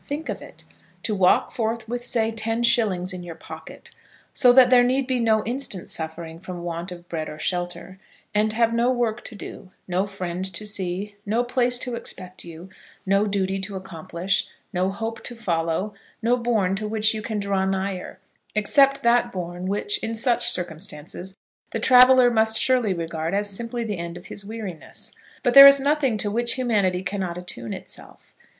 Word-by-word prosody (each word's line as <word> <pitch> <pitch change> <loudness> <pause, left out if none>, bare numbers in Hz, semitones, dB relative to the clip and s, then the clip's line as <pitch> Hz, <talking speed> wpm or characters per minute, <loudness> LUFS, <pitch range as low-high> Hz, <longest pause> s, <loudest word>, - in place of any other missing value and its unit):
Think 295 +3 -5
of - - -4
it! - - -13 0.4
To 215 - -1
walk 190 -2 +3
forth 225 0 -2
with, 240 +1 -3
say, 225 -2 +1
ten 225 +1 -1
shillings 200 -7 +2
in 180 - -6
your 175 -2 -8
pocket, - - -11 0.4
so 250 - +6
that 250 0 +7
there 250 -1 +8
need 260 +2 +1
be 255 -1 0
no 220 -2 +2
instant 240 -6 -3
suffering 160 0 -4
from 180 -1 -7
want 170 +1 -4
of 175 -1 -10
bread 160 -3 -4
or 150 - -8
shelter, 175 +2 -3 0.3
and 210 +1 +2
have 230 0 +2
no 235 +1 +2
work 240 -2 0
to 225 - -7
do, 190 - -9 0.2
no 185 +2 0
friend 185 -2 -4
to 210 - -3
see, 200 0 0
no 220 +4 0
place 245 0 +1
to 250 0 -4
expect 185 -5 -6
you, 170 +1 -10 0.4
no 200 +2 +2
duty 195 -1 -1
to 195 +1 -4
accomplish, 185 0 -2 0.3
no 185 +1 +1
hope 225 +3 -5
to 240 - -6
follow, 175 -1 -1 0.3
no 240 +2 +4
bourn 230 -6 +1
to 215 +1 -3
which 220 0 +1
you 215 - -4
can 215 0 -3
draw 200 -1 0
nigher, 190 -1 -3 0.4
except 275 +6 +3
that 235 +1 +3
bourn 180 0 -5
which, 410 - -1
in 225 - -3
such 240 +1 +1
circumstances, 175 +1 -4 0.3
the - - -3
traveller 255 -1 +7
must 220 -1 +2
surely 250 -5 +2
regard 165 0 -2
as 205 +1 0
simply 230 +4 -4
the 210 -5 -4
end 170 0 -5
of 175 - -12
his 200 - -8
weariness! 205 -5 -7 0.3
But 245 -3 +2
there 275 0 +12
is 275 0 +7
nothing 280 -4 +1
to 210 -1 -2
which 235 +2 +2
humanity 205 -8 +1
cannot 185 -3 -3
attune 115 -11 -6
itself. - - -10
205 Hz, 185 wpm, -24 LUFS, 180-235 Hz, 0.4 s, there